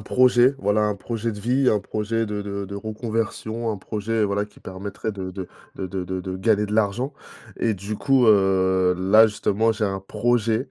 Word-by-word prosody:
projet, 125 +3 +4
voilà, 105 +2 +1
un 105 -1 +1
projet 115 +2 -3
de 105 - -7
vie, 125 +5 +2
un 105 - +3
projet 110 +2 -2
de 105 -1 -4
de 100 -1 -4
de 100 - -8
reconversion. 110 +1 -3
Un 105 - -3
projet, 110 +3 -2
voilà, 100 0 -1
qui - - -21
permettrait 100 +3 -5
de 95 -2 -6
de 95 -1 -6 0.3
de 95 - -4
de 95 0 -4
de 95 +1 -4
de 95 0 -4
gagner 105 +1 +2
de 105 - -5
l'argent. 110 +6 0 0.5
Et 115 -2 +1
du 100 +2 -5
coup, 135 -3 +3
heu, 95 -3 +4
là 105 +4 +6
justement, 110 +1 +1
j'ai 110 0 -2
un 95 -1 -2
projet, 115 +4 0
105 Hz, 195 wpm, -23 LUFS, 100-115 Hz, 0.5 s, là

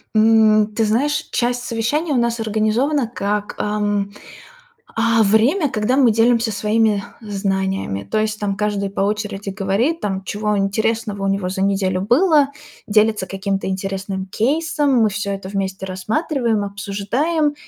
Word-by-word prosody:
М, 215 -1 +5
ты 225 - +2
знаешь, 290 +8 0
часть 245 0 0
совещаний 245 +8 -1
у 270 - +2
нас 235 -1 0
организована 225 +6 +1
как, 205 0 -2
ам, 205 -1 -1 0.8
а, 230 0 +3
время, 240 - +3
когда 215 +2 0
мы 260 -4 +5
делимся 230 +1 +2
своими 210 0 +1 0.2
знаниями. 195 - -2
То - - +2
есть 215 0 -1
там 200 -1 -2
каждый 205 -1 -1
по 195 - -3
очереди 205 0 -2
говорит, 205 - 0
там, 195 -2 -2
чего 210 +1 -1
интересного 210 +1 -1
у - - +1
него 195 -1 0
за 190 +1 -3
неделю 195 -2 +1
было, 285 - +4 0.4
делится 215 -1 +2
каким-то 195 0 -3
интересным 190 0 -3
кейсом, 285 - +1
мы 220 - +4
всё 200 0 -3
это 195 -1 -5
вместе 190 -1 -3
рассматриваем, 220 - -1
обсуждаем. 215 +11 -1
210 Hz, 145 wpm, -20 LUFS, 195-235 Hz, 0.8 s, М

